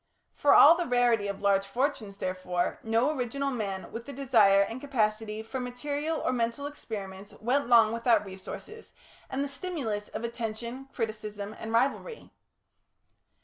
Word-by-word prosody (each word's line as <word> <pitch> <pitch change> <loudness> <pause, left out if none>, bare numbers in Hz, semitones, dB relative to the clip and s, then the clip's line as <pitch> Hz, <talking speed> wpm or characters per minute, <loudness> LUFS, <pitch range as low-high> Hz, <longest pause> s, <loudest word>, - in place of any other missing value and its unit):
For 290 - +4
all 300 - +10
the 350 0 -2
rarity 240 -4 +2
of 200 -1 -5
large 200 -1 +3
fortunes, 225 -3 -2
therefore, 185 -2 -2
no 230 +6 +2
original 275 +2 -2
man 200 -6 -4
with 230 +2 -7
the 280 - -6
desire 225 -7 +4
and 225 +5 -2
capacity 220 -5 -1
for 225 +4 -5
material 290 +6 -3
or - - 0
mental 235 +3 -1
experiments 200 -8 -7
went 250 +4 +1
long 230 -3 +6
without 230 -1 +2
resources 195 - -9 0.4
and 270 +1 -1
the - - -2
stimulus 275 - -4
of - - -6
attention, 235 +2 -5
criticism, 215 -3 -4
and 225 - -5
rivalry. 275 - -1
230 Hz, 145 wpm, -29 LUFS, 210-270 Hz, 0.4 s, all